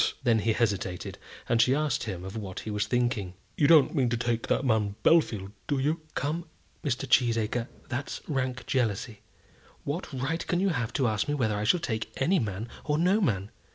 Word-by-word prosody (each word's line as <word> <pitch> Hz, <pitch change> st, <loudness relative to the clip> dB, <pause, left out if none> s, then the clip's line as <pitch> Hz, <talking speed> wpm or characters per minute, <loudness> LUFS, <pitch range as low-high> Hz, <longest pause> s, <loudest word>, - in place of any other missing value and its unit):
Then 115 Hz, -3 st, +4 dB
he 110 Hz, +1 st, +1 dB
hesitated, 100 Hz, -6 st, -1 dB, 0.3 s
and 115 Hz, -1 st, +4 dB
she 125 Hz, +3 st, +4 dB
asked 150 Hz, -4 st, 0 dB
him 95 Hz, -4 st, -5 dB
of 95 Hz, -, -7 dB
what 100 Hz, -4 st, -5 dB
he 110 Hz, -, -5 dB
was 105 Hz, 0 st, -1 dB
thinking. 110 Hz, -6 st, 0 dB, 0.2 s
"You 145 Hz, -, +3 dB
don't 150 Hz, -4 st, +6 dB
mean 130 Hz, -5 st, +2 dB
to 120 Hz, -, 0 dB
take 115 Hz, 0 st, -1 dB
that 135 Hz, -, +1 dB
man 110 Hz, -4 st, +1 dB
Bellfield, 110 Hz, -, +3 dB, 0.2 s
do 145 Hz, -, +1 dB
you?" 150 Hz, +5 st, 0 dB
"Come, 160 Hz, +4 st, -1 dB, 0.4 s
Mr. 135 Hz, -1 st, -1 dB
Cheesacre, 115 Hz, -1 st, +2 dB, 0.2 s
that's 130 Hz, +3 st, -4 dB
rank 130 Hz, -4 st, -2 dB
jealousy. 115 Hz, -3 st, -1 dB, 0.6 s
What 155 Hz, +6 st, -4 dB
right 135 Hz, +5 st, -2 dB
can 175 Hz, -, +1 dB
you 195 Hz, +1 st, +2 dB
have 120 Hz, -9 st, -1 dB
to 130 Hz, -, +2 dB
ask 110 Hz, -1 st, 0 dB
me 145 Hz, -, 0 dB
whether 110 Hz, -7 st, +1 dB
I 105 Hz, +1 st, -1 dB
shall 175 Hz, +11 st, +4 dB
take 110 Hz, -8 st, -3 dB
any 180 Hz, +8 st, +3 dB
man 105 Hz, -1 st, -3 dB, 0.2 s
or 150 Hz, -1 st, 0 dB
no 185 Hz, +6 st, +3 dB
man? 100 Hz, -, 0 dB
120 Hz, 195 wpm, -28 LUFS, 110-145 Hz, 0.6 s, don't